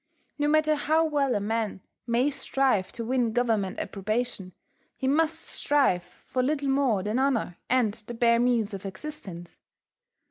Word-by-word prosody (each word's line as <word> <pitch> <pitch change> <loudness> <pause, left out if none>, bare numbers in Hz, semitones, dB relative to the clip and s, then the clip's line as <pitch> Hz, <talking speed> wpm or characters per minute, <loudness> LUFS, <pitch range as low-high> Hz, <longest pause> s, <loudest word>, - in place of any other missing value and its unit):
No 290 - +2
matter 310 0 +3
how 315 +2 +2
well 285 -4 +1
a - - +1
man 215 -1 -2 0.3
may 245 +5 +2
strive 265 -7 0
to 230 - -5
win 245 -2 +1
Government 225 -6 0
approbation, 210 -1 -3 0.5
he 265 - -2
must 315 +3 +2
strive 275 -12 +1 0.2
for 255 - -1
little 280 +1 0
more 265 -8 +2
than 210 +5 0
honour 250 -10 0
and 245 -5 +3
the 225 +2 -8
bare 235 0 +4
means 235 -4 +1
of 195 - -6
existence. 190 - -8
245 Hz, 150 wpm, -27 LUFS, 210-280 Hz, 0.5 s, bare